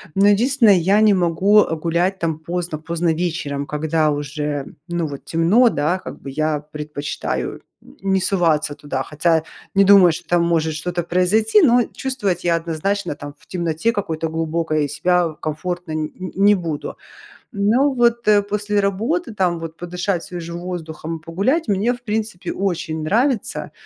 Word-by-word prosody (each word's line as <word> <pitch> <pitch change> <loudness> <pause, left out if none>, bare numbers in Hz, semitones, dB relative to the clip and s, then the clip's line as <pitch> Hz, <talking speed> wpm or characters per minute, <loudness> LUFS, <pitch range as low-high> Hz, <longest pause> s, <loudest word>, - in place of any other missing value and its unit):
Но 195 +1 +4
единственное, 230 +1 +4
я 195 +5 +3
не 215 -1 +6
могу, 185 +4 +4
э, 165 - -3
гулять 170 +4 0
там 160 -2 -2
поздно-поздно 170 0 -2
вечером, 155 -4 -2
когда 155 +1 0
уже, 145 -1 -3 0.2
ну, 170 -1 -2
вот 140 -2 -8
темно, 185 +10 +4
да, 155 +2 0
как - - -9
бы 140 - -7
я 155 +1 0
предпочитаю 150 -1 -4 0.2
н - - -18 0.2
не 190 - +3
соваться 165 -6 +1
туда. 145 -2 -4
Хотя 160 +2 +1 0.3
не 195 - +6
думаю, 195 -3 +7
что 155 - -7
там 175 -1 +2
может 160 -2 +1
что-то 175 +2 -3
произойти, 205 - +3
но 245 -5 +5
чувствовать 205 -10 -2
я 170 -1 +3
однозначно 170 +5 -2
там 145 0 -9
в - - -24
темноте 170 +4 -1
какой-то 165 -7 -3
глубокой 160 -2 -1
себя 170 +2 +1
комфортно 175 +2 -4
н 155 0 -1
н 185 0 -5
не 205 +2 +5
буду. 165 -5 -4 0.5
Ну, 235 +8 +2
вот, 235 -1 +2
э, 205 -1 +6
после 205 0 -1
работы, 225 - -1
там 180 -4 0
вот 165 -1 -7
подышать 175 +1 -3
свежим 170 -1 -6
воздухом, 165 -2 -6
погулять 200 - 0
мне 210 +5 +1
в 245 - -9
принципе 215 -4 -3
очень 170 -5 -2
нравится. 235 - 0
175 Hz, 160 wpm, -20 LUFS, 160-200 Hz, 0.5 s, думаю